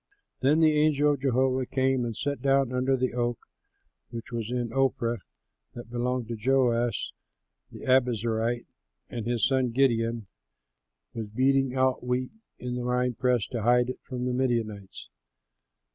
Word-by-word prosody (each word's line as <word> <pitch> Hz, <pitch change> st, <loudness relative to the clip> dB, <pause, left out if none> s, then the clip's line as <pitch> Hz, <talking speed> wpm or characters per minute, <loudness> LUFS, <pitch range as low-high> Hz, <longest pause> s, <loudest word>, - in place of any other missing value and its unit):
Then 150 Hz, +5 st, +3 dB
the 155 Hz, -1 st, +5 dB
angel 150 Hz, -1 st, +3 dB
of 140 Hz, -, -5 dB
Jehovah 130 Hz, -1 st, +1 dB
came 130 Hz, -2 st, +1 dB
and 115 Hz, -2 st, -4 dB
sat 140 Hz, +2 st, -2 dB
down 135 Hz, -2 st, +2 dB
under 130 Hz, +1 st, +1 dB
the 130 Hz, -1 st, -1 dB
oak 120 Hz, -1 st, -1 dB, 0.7 s
which 115 Hz, 0 st, -8 dB
was 115 Hz, -2 st, -3 dB
in 120 Hz, -2 st, -2 dB
Ophrah 125 Hz, -3 st, +1 dB, 0.6 s
that 120 Hz, -1 st, -9 dB
belonged 125 Hz, 0 st, -1 dB
to 115 Hz, -, -2 dB
Joash 120 Hz, -2 st, +1 dB, 0.6 s
the -, -, -11 dB
Abiezerite; 120 Hz, -2 st, +1 dB, 0.5 s
and 115 Hz, -1 st, -4 dB
his 120 Hz, -2 st, +1 dB
son, 130 Hz, -2 st, +1 dB
Gideon, 115 Hz, -3 st, +1 dB, 0.9 s
was 110 Hz, -2 st, -5 dB
beating 130 Hz, +4 st, +1 dB
out 130 Hz, -1 st, +1 dB
wheat 125 Hz, +1 st, -1 dB, 0.3 s
in 125 Hz, 0 st, -5 dB
the 125 Hz, 0 st, -3 dB
wine 125 Hz, 0 st, 0 dB
press 125 Hz, -2 st, +1 dB
to 120 Hz, -3 st, -3 dB
hide 120 Hz, +2 st, +3 dB
it -, -, -10 dB
from 125 Hz, -2 st, -5 dB
the 125 Hz, -, -1 dB
Midianites. 115 Hz, -6 st, -2 dB
125 Hz, 150 wpm, -27 LUFS, 120-130 Hz, 0.9 s, the